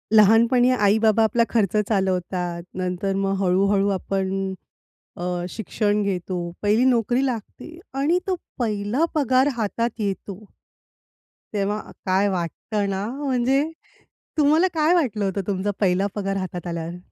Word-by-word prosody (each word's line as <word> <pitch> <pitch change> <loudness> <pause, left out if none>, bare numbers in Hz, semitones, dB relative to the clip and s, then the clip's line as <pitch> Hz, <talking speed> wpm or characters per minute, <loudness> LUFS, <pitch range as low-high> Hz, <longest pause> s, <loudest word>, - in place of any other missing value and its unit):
लहानपणी 230 +4 +5
आई-बाबा 220 -1 +3
आपला 225 +2 +3
खर्च 210 -3 +1
चालवतात. 180 -3 -1
नंतर 185 +1 -1
मग 195 0 0
हळू-हळू 195 +2 +2
आपण 190 0 -2 0.9
अ, 175 0 -2
शिक्षण 210 0 -1
घेतो, 185 -2 -2 0.3
पहिली 210 +4 +3
नोकरी 245 +1 +2
लागते 260 +7 -6 0.2
आणि 325 +6 +2
तो 375 - +1 0.2
पहिला 215 +4 0
पगार 260 -2 +3
हातात 230 +2 0
येतो. 200 -2 -3 1.2
तेव्हा 205 +1 0
अ, - - -11
काय 190 +1 +2
वाटतं 195 +3 -2
ना, 195 +1 -2 0.2
म्हणजे 265 +1 +2 0.7
तुम्हाला 310 +4 +4
काय 315 +1 +3
वाटलं 225 - +1
होतं 195 +1 -1
तुमचा 200 0 -1
पहिला 190 0 +2
पगार 195 -1 -2
हातात 185 -2 -5
आल्यावर? 170 0 -4
205 Hz, 125 wpm, -23 LUFS, 190-240 Hz, 1.2 s, लहानपणी